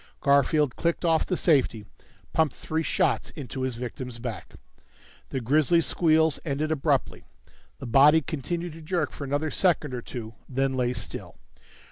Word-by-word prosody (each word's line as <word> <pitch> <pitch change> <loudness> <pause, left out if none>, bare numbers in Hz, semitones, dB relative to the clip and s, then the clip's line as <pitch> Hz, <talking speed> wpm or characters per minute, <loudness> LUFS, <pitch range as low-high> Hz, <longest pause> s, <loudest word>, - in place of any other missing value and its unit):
Garfield 140 -1 +3
clicked 170 +1 -1
off 165 -1 +2
the 180 - 0
safety, 130 - +2 0.5
pumped 160 -3 +2
three 160 +1 -2
shots 165 -1 0
into 135 -3 -6
his 130 -2 -2
victim's 125 0 -6
back. 115 -3 -7 0.7
The 135 - -2
grisly 155 +7 +3
squeals 160 -2 +2
ended 155 +1 -2
abruptly. 155 -4 0 0.5
The - - -8
body 145 +6 +6
continued 170 +4 -4
to 165 - -11
jerk 160 -1 -1
for 140 - -7
another 145 +3 -1
second 160 -7 +1
or 125 - -3
two, 115 -2 -7 0.2
then 135 0 0
lay 125 -1 0
still. - - -6
145 Hz, 150 wpm, -26 LUFS, 130-160 Hz, 0.7 s, body